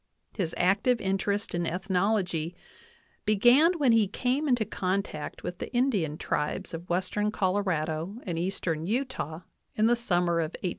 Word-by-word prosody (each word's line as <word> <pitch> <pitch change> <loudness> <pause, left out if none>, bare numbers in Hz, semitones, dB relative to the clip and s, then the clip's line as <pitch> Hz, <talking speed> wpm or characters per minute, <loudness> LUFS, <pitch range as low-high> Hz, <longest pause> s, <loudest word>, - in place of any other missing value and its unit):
His 170 -5 -2
active 205 +7 +3
interest 200 +1 -1
in 175 -1 -1
ethnology 180 -2 0 0.7
began 245 - +5
when 275 -6 +4
he 225 -3 +4
came 255 +8 -1
into 245 -5 +2
contact 190 -5 -3
with 180 - -5
the - - -5
Indian 205 - +1
tribes 165 +6 -2
of 165 +2 -7
western 185 +4 0
Colorado 185 -3 -1
and 170 -4 -3
eastern 170 -3 -2
Utah 220 - -2 0.3
in 215 - +3
the 240 +1 +5
summer 175 -7 +1
of 160 0 -2
1868^! 180 - +1
190 Hz, 145 wpm, -28 LUFS, 170-220 Hz, 0.7 s, began